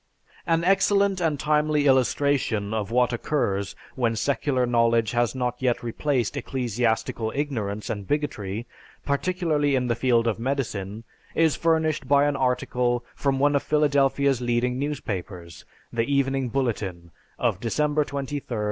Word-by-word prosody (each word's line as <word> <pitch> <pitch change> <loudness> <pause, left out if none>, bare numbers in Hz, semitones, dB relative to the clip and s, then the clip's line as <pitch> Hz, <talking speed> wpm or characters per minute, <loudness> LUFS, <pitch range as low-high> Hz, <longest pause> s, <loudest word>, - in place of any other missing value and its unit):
An 165 0 +2
excellent 195 +1 +3
and 155 -4 0
timely 150 -1 +2
illustration 130 -5 +2
of 105 -2 -2
what 125 +1 +2
occurs 100 -7 -1 0.2
when 115 -3 0
secular 135 +1 0
knowledge 115 -2 +2
has 120 +1 +1
not 125 -1 -1
yet 125 -2 0
replaced 120 0 -1
ecclesiastical 115 -2 -1
ignorance 110 -8 -2
and 100 -3 -4
bigotry, 115 -8 -2 0.4
particularly 150 -1 +1
in 125 -1 +1
the 120 - +1
field 120 -1 +2
of 115 -1 0
medicine, 115 -5 -3 0.3
is 160 -2 +3
furnished 160 -2 +1
by 145 0 +4
an 145 -1 +1
article 125 -1 0
from 135 -1 0
one 145 +1 +3
of 140 - +2
Philadelphia's 140 -3 +2
leading 120 +1 0
newspapers, 95 - -5 0.3
The 115 +3 0
Evening 135 -2 +1
Bulletin, 100 -9 -2 0.3
of - - 0
December 150 +5 +1
23, 140 0 -4
1932. 115 -3 -4
130 Hz, 140 wpm, -25 LUFS, 115-145 Hz, 0.4 s, by